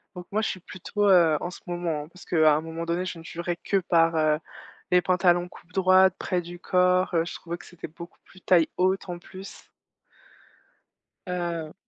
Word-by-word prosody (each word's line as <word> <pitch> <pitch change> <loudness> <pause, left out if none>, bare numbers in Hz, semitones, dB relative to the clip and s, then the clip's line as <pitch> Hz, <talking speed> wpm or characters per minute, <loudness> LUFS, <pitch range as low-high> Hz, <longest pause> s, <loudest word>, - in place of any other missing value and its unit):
Donc 180 0 -9
moi, 215 - +1
je - - +1
suis 185 - -5
plutôt, 200 +3 -2
heu 165 -5 +5
en 175 - -3
ce - - -11
moment, 170 -4 -3
parce 180 - -15
qu'à 155 -3 +4
un 155 - -1
moment 165 +1 -6
donné, 170 +2 -1
je 180 - -5
ne - - -12
jurais 170 +1 -4
que 200 - +1
par, 165 -3 +2
heu, 155 -1 +3 0.5
les 180 0 +5
pantalons 180 -1 +2
coupe 180 - -17
droite, 185 0 +5
près 180 -2 -1
du 175 +1 -10
corps. 180 0 +2
Heu, 165 - +2
je 170 - -6
trouvais 170 0 -6
que - - -15
c'était 175 - -9
beaucoup 170 +3 -12
plus 185 - -18
taille 170 -3 +3
haute, 185 +1 +1
en 175 - -4
plus. 190 +2 -12 1.6
Heu 170 -3 -3
175 Hz, 195 wpm, -26 LUFS, 165-185 Hz, 1.6 s, heu